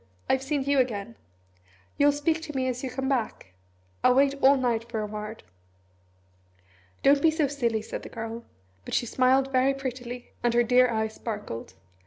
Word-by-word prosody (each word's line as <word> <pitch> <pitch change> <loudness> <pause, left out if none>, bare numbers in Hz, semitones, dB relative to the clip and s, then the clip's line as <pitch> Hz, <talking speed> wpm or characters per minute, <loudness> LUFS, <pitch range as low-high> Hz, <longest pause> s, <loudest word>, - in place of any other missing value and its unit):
I've 265 - +2
seen 275 0 -1
you 280 0 +2
again. 230 -3 -1 0.8
You'll 290 0 +4
speak 315 +3 0
to 300 -3 -8
me 260 -1 0
as 250 0 -3
you 260 - -2
come 265 +1 -3
back? 230 - -2 0.5
I'll 250 - +5
wait 275 +1 +4
all 275 +1 +6
night 235 -3 -1
for 225 -2 -3
a - - -2
word." 210 +1 -7 1.6
"Don't 280 0 +5
be 325 - +5
so 315 -1 +1
silly," 240 -6 -1
said - - -6
the - - -9
Girl; 225 +1 -6 0.4
but - - -4
she - - +1
smiled 260 +3 +2
very 265 +1 +3
prettily, 250 -2 -6
and 240 -1 +1
her 240 - +5
dear 250 +1 +4
eyes 220 -1 -1
sparkled. 205 - -6
255 Hz, 180 wpm, -27 LUFS, 230-275 Hz, 1.6 s, all